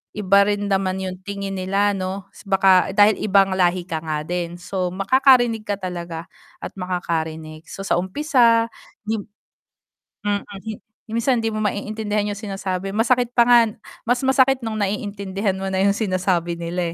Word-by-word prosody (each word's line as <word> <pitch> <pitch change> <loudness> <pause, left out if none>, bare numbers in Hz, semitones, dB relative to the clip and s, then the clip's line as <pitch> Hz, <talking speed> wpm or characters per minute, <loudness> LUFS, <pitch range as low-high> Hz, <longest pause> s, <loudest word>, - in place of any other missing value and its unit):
iba 200 -1 +4
rin 205 0 -1
naman 190 -1 +1
yung 185 -1 -5
tingin 200 -1 -5
nila 195 +2 +1
'no. 190 +1 -4 0.2
Baka 195 -2 +4
dahil 205 +2 +5
ibang 195 -2 +3
lahi 180 -1 +1
ka 160 -3 -2
nga 155 -1 -2
din 175 -1 -3
so 185 0 -3
makakarinig 240 +3 +3
ka 205 -1 -3
talaga 175 -2 -6 0.3
at - - -6
makakarinig 160 -4 -4
so - - -10
sa 195 - +1
umpisa 230 - +2 1.6
Mm, 205 -1 -1 0.6
minsan 230 +2 +1
hindi 225 - 0
mo 215 - -4
maiintindihan 210 0 -2
yung 205 - -4
sinasabi 195 -2 -4
masakit 245 +2 +1
pa 240 - +6
nga 240 0 +6 0.5
mas 245 +1 +2
masakit 265 0 +3
nung 220 -1 -3
naiintindihan 200 -1 -2
mo 195 - -4
na 190 0 0
yung 200 +2 +2
sinasabi 185 -4 0
nila 170 0 -3
195 Hz, 150 wpm, -21 LUFS, 185-215 Hz, 1.6 s, pa